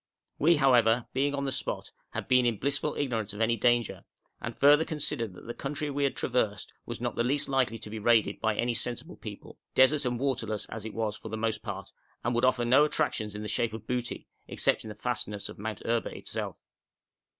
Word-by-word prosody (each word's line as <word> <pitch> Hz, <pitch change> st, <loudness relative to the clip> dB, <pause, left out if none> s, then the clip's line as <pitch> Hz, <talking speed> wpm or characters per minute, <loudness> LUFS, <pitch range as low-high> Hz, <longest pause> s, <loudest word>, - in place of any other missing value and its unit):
We, 165 Hz, +4 st, +5 dB
however, 125 Hz, -5 st, +4 dB
being 140 Hz, +2 st, +1 dB
on 140 Hz, 0 st, -2 dB
the 135 Hz, -, 0 dB
spot, -, -, -3 dB, 0.2 s
had -, -, -4 dB
been 125 Hz, 0 st, +5 dB
in 115 Hz, -3 st, +1 dB
blissful 140 Hz, +5 st, 0 dB
ignorance 115 Hz, -7 st, -1 dB
of 105 Hz, -, -8 dB
any 115 Hz, +1 st, +3 dB
danger, 120 Hz, -1 st, +1 dB, 0.4 s
and -, -, -5 dB
further 145 Hz, +3 st, +6 dB
considered 145 Hz, -, -1 dB
that -, -, -12 dB
the 120 Hz, -, -5 dB
country 145 Hz, +3 st, -3 dB
we 140 Hz, 0 st, +1 dB
had 135 Hz, -, 0 dB
traversed 110 Hz, -5 st, -1 dB
was -, -, -5 dB
not -, -, -2 dB
the -, -, +1 dB
least 140 Hz, +4 st, +1 dB
likely 130 Hz, -4 st, +1 dB
to 105 Hz, -, -8 dB
be 110 Hz, -, -4 dB
raided 110 Hz, -2 st, +3 dB
by 110 Hz, -1 st, +1 dB
any 120 Hz, +2 st, +1 dB
sensible 120 Hz, +8 st, -3 dB
people, 105 Hz, -2 st, -10 dB, 0.2 s
desert 140 Hz, +3 st, +5 dB
and 120 Hz, -1 st, -1 dB
waterless 120 Hz, -6 st, -1 dB
as 110 Hz, -1 st, -6 dB
it 110 Hz, -, -6 dB
was 110 Hz, -2 st, -1 dB
for 110 Hz, -, -8 dB
the 110 Hz, -, -3 dB
most 110 Hz, 0 st, -1 dB
part, 100 Hz, -3 st, -6 dB, 0.3 s
and 120 Hz, -, 0 dB
would 120 Hz, +1 st, +3 dB
offer 130 Hz, -2 st, +2 dB
no 130 Hz, +5 st, +6 dB
attractions 145 Hz, -9 st, 0 dB
in 105 Hz, -, -5 dB
the -, -, -4 dB
shape 110 Hz, +2 st, 0 dB
of 110 Hz, -1 st, -7 dB
booty, 125 Hz, 0 st, -3 dB, 0.2 s
except -, -, +1 dB
in 110 Hz, -, -8 dB
the 105 Hz, -, -7 dB
fastnesses 105 Hz, -2 st, -2 dB
of -, -, -10 dB
Mount 110 Hz, 0 st, -5 dB
Erba 115 Hz, 0 st, +1 dB
itself. -, -, -5 dB
120 Hz, 215 wpm, -29 LUFS, 110-135 Hz, 0.4 s, further